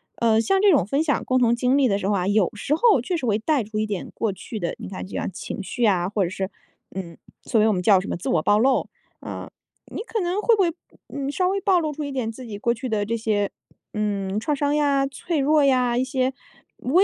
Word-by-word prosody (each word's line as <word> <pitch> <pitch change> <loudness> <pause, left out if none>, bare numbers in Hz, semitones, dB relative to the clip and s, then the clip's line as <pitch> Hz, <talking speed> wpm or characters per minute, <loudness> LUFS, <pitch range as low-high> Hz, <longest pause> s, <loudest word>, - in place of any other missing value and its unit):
呃， 225 -1 +3
像 385 - +2
这 410 -2 +6
种 205 - +3
分 280 +7 +1
享 290 -3 0
共 255 0 +2
同 235 -2 +4
经 250 +3 +2
历 275 -3 +4
的 200 - +2
时 195 - -2
候 210 - +2
啊， 180 -2 0
有 200 -2 +3
时 275 +8 -1
候 420 - +4
确 340 +8 -2
实 265 - -4
会 215 -3 +2
带 270 +3 +1
出 215 +1 -6
一 215 - +1
点 205 -4 -4
过 220 -3 -1
去 215 +3 -7
的 170 - -3
你 - - -7
看 190 0 -6
就 - - -6
像 - - -2
情 190 - -6
绪 235 +4 -1
啊 180 -4 +2
或 205 -2 0
者 175 - -1
是， 190 +1 -3 0.5
嗯， 170 -4 -6 0.3
所 220 - +2
以 - - +4
我 215 - +3
们 180 - -1
叫 195 -2 +6
什 190 - -6
么 - - -2
自 175 - -4
我 165 - +2
暴 205 +6 +3
露， 260 +2 +2 0.3
呃， - - -7 0.4
你 - - -4
可 450 -3 -3
能 355 +3 -1
会 460 +1 +4
不 400 - +1
会， 335 -2 +1 0.3
呃， 280 -1 -4
稍 365 +4 +1
微 395 +1 0
暴 375 -2 +3
露 310 -2 -2
出 305 - -5
一 285 - -4
点 245 -4 -2
自 255 +2 -10
己 210 -3 -6
过 235 +2 +1
去 255 +2 -5
的 215 -2 0
这 230 +2 -1
些， 210 -2 0 0.4
嗯， 205 -2 -1
创 290 +6 -1
伤 290 +1 0
呀？ 280 -2 +2
脆 315 +3 -3
弱 295 +2 +3
呀？ 250 -3 +3
一 255 - +2
些 260 0 0 0.5
微 330 +10 +3
240 Hz, 285 characters per minute, -23 LUFS, 205-290 Hz, 0.5 s, 这